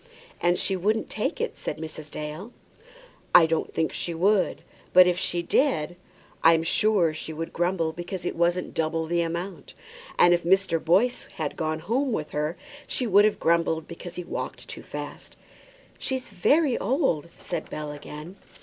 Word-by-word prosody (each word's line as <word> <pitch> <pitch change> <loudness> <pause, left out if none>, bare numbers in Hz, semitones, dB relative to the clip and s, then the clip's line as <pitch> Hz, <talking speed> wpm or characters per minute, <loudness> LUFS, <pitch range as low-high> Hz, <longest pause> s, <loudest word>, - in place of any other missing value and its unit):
"And 175 +1 +3
she 195 - +1
wouldn't 215 +4 0
take - - -2
it," 470 - -2
said - - -4
Mrs. 155 -1 -8
Dale. 150 +9 -6 0.8
"I 170 - +9
don't 160 0 -1
think 160 - -1
she 170 - -2
would. 195 +3 +2 0.3
But 185 0 +9
if 180 -1 +1
she 175 0 0
did, 175 - +1 0.5
I'm 165 0 +6
sure 180 -2 +3
she 155 - -6
would 165 +1 -5
grumble 175 -2 0
because 175 +1 -6
it - - -2
wasn't 175 +1 0
double 160 0 -1
the 170 +1 +1
amount. 170 +3 -5 0.4
And 175 - +6
if 175 - +1
Mr. 185 -2 +2
Boyce 200 +10 +2
had 155 -3 -3
gone 155 0 -1
home 260 - 0
with 155 -6 -3
her, 150 +3 -2 0.3
she 255 - -1
would 205 -1 +6
have 215 - +2
grumbled 165 -1 +1
because 170 +1 -9
he 180 - -4
walked - - -6
too - - -7
fast." - - -8 0.6
"She 265 - -1
is 260 - -5
very 270 - +2
old," 220 - 0
said 170 -3 -5
Bell, 150 -1 -5
again. 150 +5 -9
175 Hz, 170 wpm, -26 LUFS, 160-195 Hz, 0.8 s, I